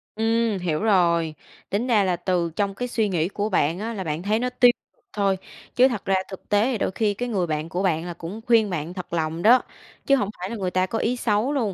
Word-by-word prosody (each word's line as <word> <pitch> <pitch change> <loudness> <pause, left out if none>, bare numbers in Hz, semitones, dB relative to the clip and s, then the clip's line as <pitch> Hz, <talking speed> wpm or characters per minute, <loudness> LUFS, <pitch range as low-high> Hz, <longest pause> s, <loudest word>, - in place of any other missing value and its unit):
Ừm, 225 -1 +1
hiểu 165 -4 -1
rồi. 170 -6 +2 0.3
Tính 215 +5 -1
ra 220 -5 +4
là 185 -2 +1
từ 175 -1 -1
trong 200 0 -1
cái 245 +4 -3
suy 225 -3 0
nghĩ 170 -3 0
của 205 +1 -2
bạn 165 -2 +1
á 225 +3 -3
là 195 -4 -4
bạn 155 0 -3
thấy 210 +3 +1
nó 250 +1 -1
tiêu 250 -1 +5 0.4
thôi, 200 -2 +1 0.4
chứ 255 +1 +6
thật 235 -6 -4
ra 195 - +2
thực 190 - -10
tế 220 +4 +2
đôi - - -1
khi 210 +1 0
cái 245 +5 -4
người 190 -6 0
bạn 155 0 -3
của 180 +3 -2
bạn 165 -3 +1
là 175 - -5
cũng 175 +7 -8
khuyên 225 -3 +4
bạn 170 -1 -4
thật 180 -2 -8
lòng 160 0 -1
đó, 240 +6 +6 0.4
chứ 275 - +5
hổng 205 -7 -1
phải 185 +2 -4
là 235 - -4
người 190 -4 -2
ta 185 +1 +2
có 225 +4 -3
ý 245 - 0
xấu 230 +5 +1
luôn. 225 -8 0
200 Hz, 250 wpm, -24 LUFS, 175-225 Hz, 0.4 s, chứ